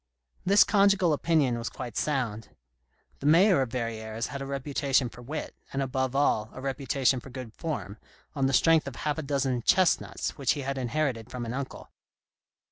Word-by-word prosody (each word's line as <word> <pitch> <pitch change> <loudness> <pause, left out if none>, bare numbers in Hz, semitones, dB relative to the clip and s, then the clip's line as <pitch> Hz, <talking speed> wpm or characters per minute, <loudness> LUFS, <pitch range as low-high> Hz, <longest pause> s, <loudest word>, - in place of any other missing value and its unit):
This 200 +2 +6
conjugal 200 -4 +3
opinion 145 -6 +1
was 115 - -3
quite 120 -4 -7
sound. 120 -7 -1 0.7
The 140 - -2
Mayor 175 +2 +6
of 130 - -1
Verrieres 115 -2 -3
had 140 - -6
a 135 - -5
reputation 140 -1 0
for 120 - -13
wit, 150 +5 -5 0.2
and 135 - -3
above 130 -1 -1
all, 110 -6 +2
a - - -8
reputation 135 -1 0
for 135 - -12
good 125 -3 -8
form, 130 -10 -5 0.3
on 135 -2 +1
the 135 - -1
strength 160 +3 +4
of 135 - -6
half 150 +4 -2
a - - -1
dozen 135 -4 -1
"chestnuts" 185 0 +1
which 135 -3 +2
he 145 - -4
had 135 0 -3
inherited 125 -2 -1
from 125 -2 -5
an 115 - -4
uncle. 135 0 -6
135 Hz, 180 wpm, -28 LUFS, 120-150 Hz, 0.7 s, This